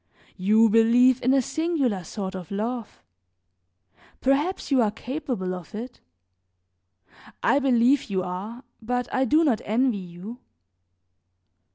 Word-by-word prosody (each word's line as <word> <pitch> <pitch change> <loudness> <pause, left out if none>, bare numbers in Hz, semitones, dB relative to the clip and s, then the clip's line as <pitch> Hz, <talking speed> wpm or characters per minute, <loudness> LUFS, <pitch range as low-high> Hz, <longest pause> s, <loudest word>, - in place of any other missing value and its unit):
You 215 +4 +4
believe 235 +3 +4
in 255 - +2
a 270 -1 +3
singular 280 - -1
sort 190 +3 -5
of 185 -3 -8
love; 225 +3 -4 1.2
perhaps 290 +7 0
you 265 -2 +4
are 220 - +3
capable 245 -5 -4
of 180 +1 -9
it; 240 +3 -8 1.4
I 280 - +3
believe 260 0 +3
you 190 -2 -1
are, 200 +8 -6 0.2
but 245 +2 -2
I 260 0 +2
do 305 +6 +3
not 250 -9 +1
envy 230 0 +1
you. 185 +6 -9
235 Hz, 125 wpm, -25 LUFS, 200-260 Hz, 1.4 s, You